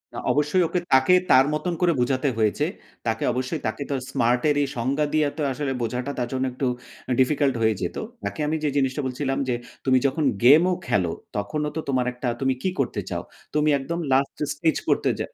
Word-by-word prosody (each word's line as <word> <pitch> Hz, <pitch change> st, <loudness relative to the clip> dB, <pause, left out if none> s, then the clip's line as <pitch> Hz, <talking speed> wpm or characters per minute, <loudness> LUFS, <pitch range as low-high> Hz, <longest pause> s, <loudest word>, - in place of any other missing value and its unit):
অ -, -, -5 dB
অবশ্যই 150 Hz, +5 st, +2 dB
ওকে 180 Hz, -, 0 dB
তাকে 130 Hz, +7 st, +5 dB, 0.2 s
তার 130 Hz, +1 st, +7 dB
মতন 160 Hz, +3 st, -1 dB
করে 175 Hz, -1 st, +4 dB
বোঝাতে 130 Hz, +2 st, +1 dB
হয়েছে। 110 Hz, +7 st, +1 dB, 0.4 s
তাকে 115 Hz, 0 st, 0 dB
অবশ্যই 130 Hz, +4 st, -2 dB
তাকে 110 Hz, +6 st, -3 dB
তো 140 Hz, -, 0 dB, 0.2 s
smart 120 Hz, -1 st, +2 dB
এর 145 Hz, -, +3 dB
এই -, -, -1 dB
সংজ্ঞা 140 Hz, +5 st, +1 dB
দিয়ে 155 Hz, -1 st, +3 dB
তো -, -, -3 dB
আসলে 140 Hz, 0 st, -2 dB
বোঝাটা 125 Hz, +4 st, -2 dB
তার 120 Hz, -, -1 dB
জন্য 130 Hz, 0 st, 0 dB
একটু 130 Hz, 0 st, -1 dB, 0.4 s
আ -, -, 0 dB
difficult 135 Hz, +1 st, +3 dB
হয়ে 110 Hz, 0 st, +3 dB
যেতো। 90 Hz, -, -3 dB, 0.2 s
তাকে -, -, -4 dB
আমি 155 Hz, -, 0 dB
যে 150 Hz, -, +2 dB
জিনিসটা 135 Hz, +1 st, +1 dB
বলছিলাম, 135 Hz, +1 st, -2 dB
যে 120 Hz, -, +1 dB, 0.3 s
তুমি 130 Hz, -1 st, +4 dB
যখন 150 Hz, +3 st, -1 dB, 0.2 s
game 150 Hz, +8 st, +8 dB
ও -, -, +2 dB
খেলো, 90 Hz, -5 st, +1 dB, 0.3 s
তখনও 150 Hz, +9 st, -2 dB
তো -, -, -1 dB
তোমার 130 Hz, -2 st, +1 dB
একটা 125 Hz, 0 st, -5 dB
তুমি 135 Hz, 0 st, +2 dB
কি 190 Hz, -, +2 dB
করতে -, -, 0 dB
চাও? -, -, -3 dB, 0.3 s
তুমি 150 Hz, 0 st, +2 dB
একদম 170 Hz, +6 st, -4 dB
last 135 Hz, +1 st, +2 dB, 0.2 s
stage 160 Hz, +2 st, +1 dB
করতে -, -, +2 dB
যা -, -, -1 dB
135 Hz, 205 wpm, -24 LUFS, 125-150 Hz, 0.4 s, game